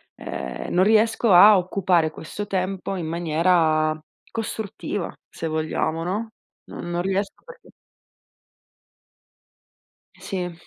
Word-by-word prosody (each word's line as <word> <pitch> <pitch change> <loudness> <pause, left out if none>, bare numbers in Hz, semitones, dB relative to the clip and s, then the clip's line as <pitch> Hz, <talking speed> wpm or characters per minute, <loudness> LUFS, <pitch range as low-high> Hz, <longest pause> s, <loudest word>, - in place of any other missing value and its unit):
Ehm, 65 0 -6
non 180 - +4
riesco 220 +2 +3
a 200 +3 +9
occupare 180 -3 +1
questo 205 +7 -7
tempo 190 0 -2
in 170 - -4
maniera 160 -1 +2 0.3
costruttiva, 220 -4 -4 0.2
se 165 - -5
vogliamo, 160 +1 -1
no, 210 +5 -3 0.3
no - - -9
non 175 0 -2
riesco 195 +2 -2
perchè 485 0 -14 2.5
Sì. 180 -3 -4
180 Hz, 100 wpm, -23 LUFS, 165-200 Hz, 2.5 s, a